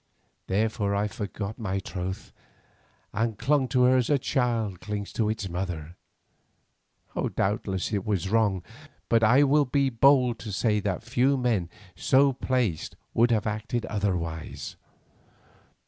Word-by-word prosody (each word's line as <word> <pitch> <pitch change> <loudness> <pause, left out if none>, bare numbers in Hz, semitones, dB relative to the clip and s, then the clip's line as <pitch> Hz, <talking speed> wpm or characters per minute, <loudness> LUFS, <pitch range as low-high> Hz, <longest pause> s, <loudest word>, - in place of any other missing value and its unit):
Therefore 105 0 0
I 105 +1 +1
forgot 105 +1 -5
my 95 -4 -2
troth 95 -1 -5 0.8
and 110 0 -1
clung 135 +3 +2
to 125 -1 +2
her 130 +1 +5
as 125 - +1
a 145 - +4
child 115 - -1
clings 105 -1 -5
to 110 -2 0
its 110 -2 -2
mother. 85 -3 -4 1.4
Doubtless 95 0 -1
it 100 -2 0
was 95 -5 -1
wrong, 100 -3 +1 0.5
but 115 -1 +4
I 125 +6 +6
will 145 +1 +4
be 135 +1 +1
bold 125 -1 +4
to 110 - -6
say 105 +1 +1
that 100 -1 -2
few 125 +4 +2
men 115 -9 0 0.3
so 135 0 +4
placed 125 - -1 0.2
would 120 +1 +4
have 110 -3 +1
acted 110 +2 -2
otherwise. 90 -6 -3
110 Hz, 135 wpm, -27 LUFS, 100-125 Hz, 1.4 s, I